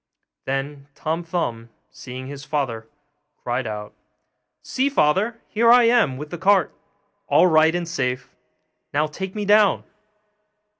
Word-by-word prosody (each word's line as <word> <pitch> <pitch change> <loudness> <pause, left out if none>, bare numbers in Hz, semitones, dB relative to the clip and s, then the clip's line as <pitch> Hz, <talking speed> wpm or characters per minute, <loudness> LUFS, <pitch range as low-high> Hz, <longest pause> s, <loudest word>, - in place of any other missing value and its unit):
Then 140 +1 -4
Tom 165 +2 -3
Thumb, 120 -10 -3 0.2
seeing 130 +1 -9
his 140 +1 -8
father, 135 -7 -3 0.6
cried 120 0 -2
out, 105 -1 -6 0.7
'See, 265 +2 0
father, 215 - +1
here 230 +2 +3
I 245 0 +7
am 230 - +3
with 150 +2 -8
the 175 - -6
cart, 190 -3 +3 0.5
all - - +5
right 160 -1 +4
and 175 -1 -2
safe! 130 -6 -3 0.6
now 150 +1 +3
take 190 +6 -6
me 210 -1 -3
down! 205 0 +4
155 Hz, 135 wpm, -22 LUFS, 130-195 Hz, 0.7 s, I